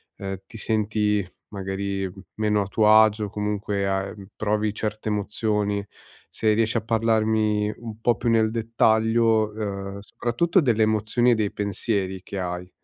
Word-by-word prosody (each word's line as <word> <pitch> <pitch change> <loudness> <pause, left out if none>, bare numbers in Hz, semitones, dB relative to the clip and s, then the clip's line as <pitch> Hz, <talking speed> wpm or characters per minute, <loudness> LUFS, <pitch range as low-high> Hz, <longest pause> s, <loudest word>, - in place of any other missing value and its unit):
ehm, 95 -1 -4
ti 110 - -11
senti 105 -2 0 0.2
magari 95 -1 -3 0.2
meno 105 -1 +1
a 100 - -1
tuo 105 +1 +3
agio 110 0 +5
o 100 - -6
comunque 105 -1 -2
a, 95 0 0
ehm 100 -1 -10
provi 105 0 0
certe 110 0 -3
emozioni. 105 -1 -1 0.4
Se 110 -1 +1
riesci 115 +1 +1
a 115 - 0
parlarmi 110 -2 +1
un 115 -2 -8
po' 120 -1 +3
più 120 - -1
nel 110 -1 +3
dettaglio, 110 -1 +2
uhm, 100 -2 -4
soprattutto 125 - 0
delle 115 -6 +2
emozioni 110 +3 +2
e - - +4
dei 105 -2 0
pensieri 100 -2 -2
che 100 - -6
hai. 90 0 -4
105 Hz, 155 wpm, -24 LUFS, 100-110 Hz, 0.4 s, agio